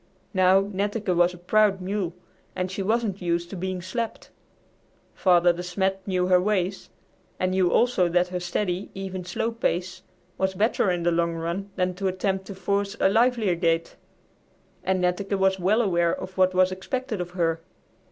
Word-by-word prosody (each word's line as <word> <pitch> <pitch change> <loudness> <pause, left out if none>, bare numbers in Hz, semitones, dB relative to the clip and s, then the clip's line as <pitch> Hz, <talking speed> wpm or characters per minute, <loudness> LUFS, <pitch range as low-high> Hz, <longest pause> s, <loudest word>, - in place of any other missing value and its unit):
Now, 185 0 +5
Netteke 200 0 -2
was 175 +1 +3
a - - -12
proud 200 +2 +2
mule 185 -2 -3 0.4
and 180 0 -2
she 195 - -3
wasn't 210 -1 0
used 170 0 -1
to - - -5
being 185 0 -4
slapped. 225 +5 -4 0.8
Father 175 -2 +4
De 175 - -6
Smet 190 +2 -1
knew 185 -2 +1
her 180 0 +4
ways, 195 -1 -1 0.5
and 185 0 +1
knew 185 -2 +2
also 235 -8 +3
that 180 +1 +2
her 180 0 -3
steady, 180 +1 -2
even, 190 -1 -5
slow 225 +6 -2
pace 185 -5 -2 0.4
was 190 0 0
better 210 0 +2
in 175 -1 -1
the 175 - +2
long 170 0 0
run 170 +5 -3
than 180 0 0
to 195 +2 -2
attempt 190 +1 -1
to 200 - -7
force 200 +2 -1
a - - +4
livelier 225 -2 +3
gait, 165 -1 0 0.9
and 185 0 0
Netteke 195 +3 0
was 190 0 +2
well 210 +6 +3
aware 175 -4 +2
of 185 - -8
what 185 -1 +3
was 185 0 +4
expected 225 +3 -3
of 175 - -5
her. 165 -1 +1
185 Hz, 175 wpm, -25 LUFS, 180-200 Hz, 0.9 s, Now